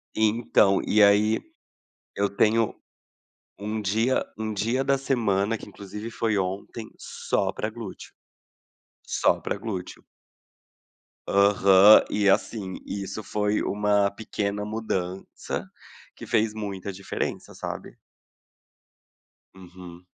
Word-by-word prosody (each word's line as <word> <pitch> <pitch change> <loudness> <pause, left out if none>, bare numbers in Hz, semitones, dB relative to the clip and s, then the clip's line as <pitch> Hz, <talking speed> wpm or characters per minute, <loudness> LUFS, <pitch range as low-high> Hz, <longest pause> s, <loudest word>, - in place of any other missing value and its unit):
Então 110 -2 +3
e 110 - +4
aí, 105 +2 +5 0.7
eu 100 0 +1
tenho, 110 +2 +2 0.9
um 105 +2 -3
dia 110 +6 +1
um 110 0 -3
dia 115 +6 0
da 135 0 +2
semana 115 -6 0
que - - -11
inclusive 105 +3 -8
foi 110 -1 -1
ontem 100 +4 -4
só - - -2
pra - - -3
glúteo. - - -9 1.0
Só - - +2
pra - - -3
glúteo. 95 -5 -6 1.2
Aham, 100 0 +6
e 105 -1 +2
assim 95 -1 0
isso 100 +1 -5
foi 105 +1 0
uma 105 -1 +1
pequena 105 -1 -3
mudança 95 -4 -4 0.5
que - - -10
fez 110 -1 +1
muita 100 -2 -5
diferença 95 +1 -5
sabe? - - -7 1.6
Uhum. 90 -1 -12
105 Hz, 105 wpm, -25 LUFS, 100-110 Hz, 1.6 s, Aham